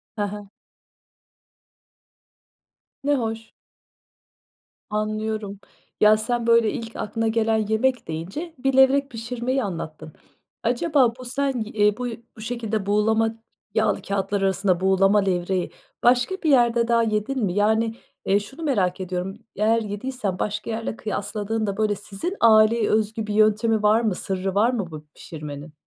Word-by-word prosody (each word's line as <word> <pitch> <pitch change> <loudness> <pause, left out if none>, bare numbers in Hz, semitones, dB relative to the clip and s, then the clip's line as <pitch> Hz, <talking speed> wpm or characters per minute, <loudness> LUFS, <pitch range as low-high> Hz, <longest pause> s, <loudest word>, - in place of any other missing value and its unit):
Ha 205 -2 -1
ha. 205 -1 -9 2.5
Ne 290 +1 +2
hoş. 225 -3 -4 1.4
Anlıyorum, 215 -1 -3 0.4
ya, 215 0 +6
sen 235 +1 -2
böyle 230 -2 +4
ilk 225 0 -6
aklına 225 +2 -2
gelen 225 0 +2
yemek 240 +3 0
deyince 190 - -5
bir 270 +1 0
levrek 275 +1 +5
pişirmeyi 245 +3 -2
anlattın. 155 -4 -6 0.5
Acaba 250 0 +2
bu 255 - -8
sen 275 +2 -1
i 215 - -4
eee, 210 -1 +2
bu 250 0 -3 0.3
bu 215 - -10
şekilde 220 -3 -3
buğulama 220 +2 +2 0.4
yağlı 220 0 +1
kâğıtlar 200 0 -2
arasında 190 -1 +1
buğulama 195 +2 +4
levreği 185 -1 -1 0.3
başka 245 +9 +3
bir 315 - +2
yerde 240 -3 +4
daha 235 -1 +3
yedin 220 +4 -1
mi? 180 - -1
Yani, 220 +3 +2 0.3
eee, 200 +1 +3
şunu 270 +11 -9
merak 195 - +1
ediyorum, 185 +1 -4 0.2
eğer 225 +2 +2
yediysen 205 -2 -4
başka 210 +1 -3
yerle 225 0 -3
kıyaslandığında, 210 0 -3
böyle, 215 -1 +1
sizin 205 - -5
aileye 220 0 +5
özgü 215 0 0
bir 210 - -2
yöntemi 215 +1 +3
var 215 +2 +4
mı, 215 -5 0
sırrı 190 0 -3
var 215 +4 +4
mı 195 -8 -3
bu 155 -1 -9
pişirmenin? 150 -1 -8
215 Hz, 140 wpm, -23 LUFS, 200-235 Hz, 2.5 s, ya